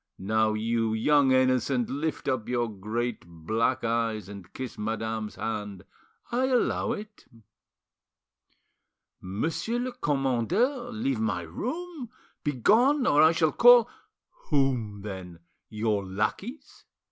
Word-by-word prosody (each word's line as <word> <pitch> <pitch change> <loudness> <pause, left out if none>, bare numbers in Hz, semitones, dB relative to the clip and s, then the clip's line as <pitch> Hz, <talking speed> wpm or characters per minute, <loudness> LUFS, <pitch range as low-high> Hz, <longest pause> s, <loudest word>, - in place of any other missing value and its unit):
Now, 110 +2 +1
you 115 0 0
young 140 +4 +3
innocent, 130 -1 +2
lift 150 +3 -3
up 130 -5 -1
your 120 -1 0
great 110 +3 -3
black 110 +10 -1
eyes 115 -3 -1
and 100 -3 -10
kiss 130 -2 -6
madame's 110 0 -3
hand; 105 -4 -4 0.5
I 255 +2 +1
allow 250 -2 +1
it." 210 0 -9 2.0
"Monsieur 160 - -2
le 250 +1 -2
commandeur, 185 - 0
leave 135 - -1
my 105 -6 -1
room; 265 - -5 0.3
begone, 230 - +3
or 145 -6 +4
I 160 +1 +7
shall 160 -2 +2
call——" 245 0 +7 0.6
"Whom, 125 -8 0
then? 90 -4 -8 0.3
Your 105 -2 -1
lackeys? 105 - -4
120 Hz, 110 wpm, -27 LUFS, 110-165 Hz, 2.0 s, I